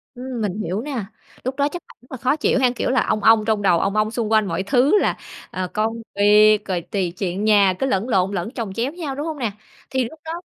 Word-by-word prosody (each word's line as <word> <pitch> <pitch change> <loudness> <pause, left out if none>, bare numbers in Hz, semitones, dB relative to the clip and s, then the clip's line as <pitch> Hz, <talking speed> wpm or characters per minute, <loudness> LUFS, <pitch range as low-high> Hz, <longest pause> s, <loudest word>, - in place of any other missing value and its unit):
Ừm. 250 -1 -5
Mình 205 0 -2
hiểu 200 +3 -2
nè, 260 -6 -4 0.4
lúc 260 +1 -3
đó 285 0 +1
chắc 350 - -6
bạn - - -18
rất 250 - -24
là 260 - -5
khó 255 +5 +1
chịu 295 -3 +1
ha, 255 -1 +4
kiểu - - -1
là, 260 - +2
ong 215 - 0
ong 220 -1 +5
trong 220 -2 +1
đầu, 180 -4 +3
ong 200 +1 -1
ong 215 0 +1
xung 225 -2 -2
quanh 215 -2 +3
mọi 170 +1 -2
thứ 270 - +3
là, - - 0 0.3
à, 185 0 -3
công 225 +2 -1
việc 210 +1 +6
rồi 180 -3 -2
tùy 180 0 -3
chuyện 190 +1 -2
nhà 200 -3 +5
cứ 270 - +1
lẫn 230 -1 -1
lộn 190 -2 +2
lẫn 195 +2 -3
chồng 225 -7 -5
chéo 240 +6 -2
nhau, 315 -6 -5
đúng 290 +3 -4
hông 315 -2 -4
nè? 235 -5 -1 0.4
Thì 260 -1 0
lúc 305 +7 -8
đó 320 - -5
220 Hz, 265 wpm, -21 LUFS, 200-260 Hz, 0.4 s, việc